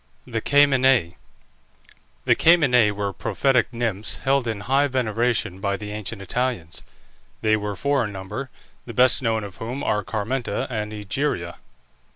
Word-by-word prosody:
THE 115 -1 -3
CAMENÆ. 135 - +4 1.1
The - - +5
Camenæ 130 -10 +5
were 100 -1 -3
prophetic 125 0 +1
nymphs 115 -4 -2
held 135 -2 +1
in 110 -3 -3
high 135 +6 +2
veneration 120 -6 -1
by 100 0 -1
the 105 0 -7
ancient 105 -1 -5
Italians. 115 -7 -2 0.6
They 110 0 +4
were 105 -1 -3
four 140 +2 +1
in 105 - -5
number, 105 +8 -6 0.4
the 120 - -6
best 125 0 +4
known 110 -3 0
of 100 -2 -9
whom 125 +5 -5
are 105 0 0
Carmenta 110 +2 -2
and 105 -2 -3
Egeria. 105 -4 -3
115 Hz, 145 wpm, -23 LUFS, 105-130 Hz, 1.1 s, The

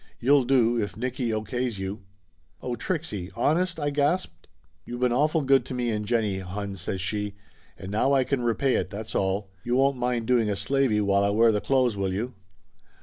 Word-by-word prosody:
You'll 140 +1 +4
do, 120 -3 +3
if 105 - -4
Nicky 125 0 -2
O. 110 0 -1
K's 125 -2 -2
you." 95 +2 -5 0.6
"Oh, 125 -1 -3
Trixie 115 - -3
honest?" 165 +8 +1
I 145 -1 -1
gasped. 145 +6 -1 0.4
"You 120 - -6
been 125 -1 +1
awful 155 +5 +2
good 135 0 +4
to 130 - -5
me 120 -1 -1
and 105 -1 -3
Jennie, 110 -4 0
hon," 100 +2 -5
says 95 +1 -4
she. 105 +1 -2 0.4
"And 95 0 -8
now 110 +6 +2
I 135 -2 +4
can 135 0 -1
repay 120 +3 +1
it, - - -2
that's 110 +1 -7
all! 95 +1 -1
You 120 +1 0
won't 135 +1 +3
mind 125 -2 -1
doing 120 -3 +2
a 100 - 0
slavey, 110 +1 +1
while 100 0 +2
I 100 - +2
wear 115 +3 +4
the 105 -1 0
clothes, 130 -4 +2
will 95 -1 -1
you?" 115 +7 -3
120 Hz, 205 wpm, -26 LUFS, 105-130 Hz, 0.6 s, You'll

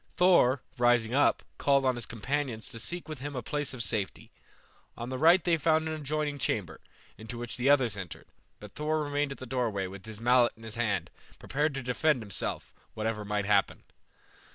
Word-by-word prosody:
Thor, 175 -8 +5 0.2
rising 120 -1 +3
up, 145 +2 +3 0.2
called 140 -1 +3
on 130 - +3
his 120 -2 -4
companions 120 0 -3
to 115 - -8
seek 175 +9 -2
with 155 -4 -6
him 145 +2 -5
a 125 - -3
place 145 +3 -2
of 125 -3 -3
safety. 105 -5 -2 0.7
On 120 +1 -5
the 130 - -3
right 170 +3 +6
they 170 -2 +3
found 160 +1 +2
an 160 - -2
adjoining 150 -1 -2
chamber, 105 -8 -2 0.4
into 110 +2 -7
which 120 0 -4
the 125 +2 +1
others 130 -7 +4
entered, 90 -4 -7 0.3
but 105 -1 -11
Thor 155 +1 -1
remained 145 0 -1
at 135 - -6
the 130 - -8
doorway 115 -6 -1
with 95 +2 -9
his 110 -2 -7
mallet 120 +1 +4
in 115 - -15
his 110 -1 -7
hand, 115 -3 -1 0.3
prepared 145 +1 -1
to 135 - -4
defend 125 +1 +1
himself, 100 -3 -3 0.2
whatever 110 -1 -2
might 105 -1 -1
happen. 100 -1 +2
125 Hz, 195 wpm, -29 LUFS, 110-145 Hz, 0.7 s, right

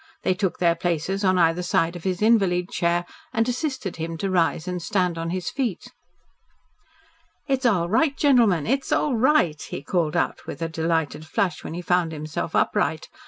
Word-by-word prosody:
They 185 - +2
took 190 -1 -2
their 170 -1 +3
places 175 +3 -2
at 185 -1 +3
either 165 0 +3
side 170 -1 +1
of 175 - -9
his 185 +1 -1
invalid 195 -5 +3
chair 175 0 0 0.3
and 225 +1 +1
assisted 255 - -3
him 165 0 -4
to 195 +3 -2
rise 170 -1 +1
and 180 -1 -3
stand 180 0 0
on 165 0 -3
his 180 0 -3
feet. 245 -10 -3 1.6
"It's 265 -2 +1
all 180 -7 +2
right, 275 - +2
gentlemen. 230 - +4
It's 270 +3 -1
all 285 -4 +2
right," 225 - +2
he - - -6
called 170 -4 0
out - - -1
with 170 - -5
a - - 0
delighted 160 -2 -1
flush, 180 +2 -1
when - - -6
he 175 - -5
found 175 -2 +1
himself 155 -1 -4
upright. - - 0
180 Hz, 180 wpm, -24 LUFS, 165-215 Hz, 1.6 s, gentlemen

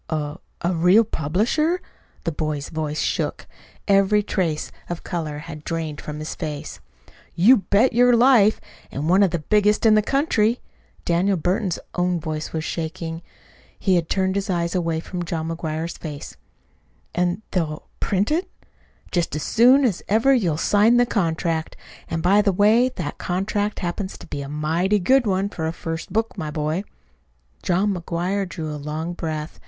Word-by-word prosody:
"A 150 +1 -3 0.2
a 175 +1 0
real 180 +6 +5
publisher?" 225 - 0 0.4
The 165 - -1
boy's 150 -2 -3
voice 155 -1 -3
shook. - - -2 0.4
Every 200 +1 +4
trace 170 -7 -1 0.2
of 175 -1 -5
color 160 -4 -4
had 155 0 -9
drained 160 -3 -4
from 150 0 -6
his 155 +1 -5
face. 150 -4 -6 0.6
"You 225 +10 +6
bet 210 +5 +2
your 245 +1 +5
life 230 -4 +5 0.3
and 145 +3 -4
one 185 +4 +4
of 195 - +5
the 170 - -1
biggest 210 +1 +3
in 220 - +7
the 215 - +5
country." 240 -3 +1 0.5
Daniel 180 +3 +2
Burton's 185 +2 0 0.2
own 180 -1 0
voice 155 -1 -4
was 160 -1 -3
shaking. 165 0 -4 0.6
He 190 - +1
had 170 -2 0
turned 190 -1 +1
his 200 0 -2
eyes 170 -2 0
away 165 -3 -1
from 180 +1 -5
John 165 -1 -3
McGuire's 165 0 -4
face. 150 -3 -7 0.8
"And 180 +4 0
they'll 155 -4 -2
print 200 +6 0
it?" 345 +5 0 0.6
"Just 170 -4 0
as 150 - -3
soon 255 +4 +5
as 205 -8 0
ever 225 +6 +4
you'll 180 - +1
sign 210 +7 +4
the 245 - +5
contract. 165 -6 -1 0.3
And, 165 0 -3
by 195 +4 +5
the 205 -1 +2
way, 215 +6 +4
that 160 -6 -5
contract 205 +3 -1
happens 190 +2 -4
to - - -12
be 145 - -5
a 140 - -6
mighty 165 +7 +1
good 255 +5 +3
one, 195 0 +1
for 160 -5 -4
a - - -1
first 165 +1 -6
book, 225 +3 -1
my 155 -3 -3
boy." 155 +5 -2 0.8
John 190 +3 +1
McGuire 180 +2 -2
drew 160 -4 -5
a 150 - -6
long 155 +4 -4
breath. 155 -2 -5
175 Hz, 170 wpm, -22 LUFS, 160-205 Hz, 0.8 s, in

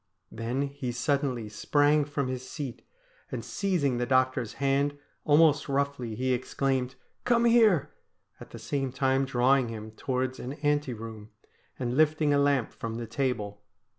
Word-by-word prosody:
Then 120 +5 -2
he 140 -3 -4
suddenly 125 -2 -1
sprang 145 +7 +2
from 140 -2 -2
his 130 0 -5
seat, 140 -7 -6 0.5
and - - -4
seizing 170 -11 0
the 120 - -1
doctor's 130 -3 +1
hand 140 +1 0 0.3
almost 150 -1 +4
roughly 140 -5 -1
he 130 +2 0
ex 125 0 -4
claimed: 130 -2 0
' - - -46
Come 235 -1 +3
here! 225 - +4 0.2
' - - -43
at - - -10
the - - -9
same 135 -2 -2
time 135 0 +1
drawing 130 0 +3
him 110 -1 -7
towards 130 +3 -2
an 130 - -5
ante 145 -3 0
room, 110 -1 -9 0.5
and 125 -1 -2
lifting 155 0 +3
a 140 - +3
lamp 140 -4 +2
from 115 -1 -5
the 120 0 -4
table. 115 -4 -2
135 Hz, 165 wpm, -28 LUFS, 125-145 Hz, 0.5 s, almost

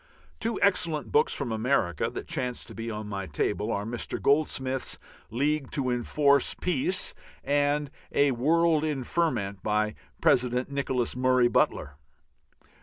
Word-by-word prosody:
Two 230 0 -1
excellent 170 -6 +1
books 450 +1 +3
from 120 - -3
America, 110 - 0
that - - -7
chance 125 -1 -3
to - - -11
be 115 0 -5
on 105 -1 -5
my 100 -2 -4
table, 100 +7 -1
are 100 0 -2
Mr. 120 +2 -4
Goldsmith's 135 -3 0 0.3
"League 140 +3 0
to 130 -3 0
Enforce 140 +3 +2
Peace" 180 +2 0 0.3
and 145 0 +1 0.2
"A 140 -1 +3
World 155 +5 +2
in 150 -4 -1
Ferment" 120 - -1
by 105 +1 0 0.3
President 125 +1 +2
Nicholas 130 -4 -1
Murray 130 -1 +3
Butler. 70 -10 0
130 Hz, 135 wpm, -27 LUFS, 115-150 Hz, 0.3 s, books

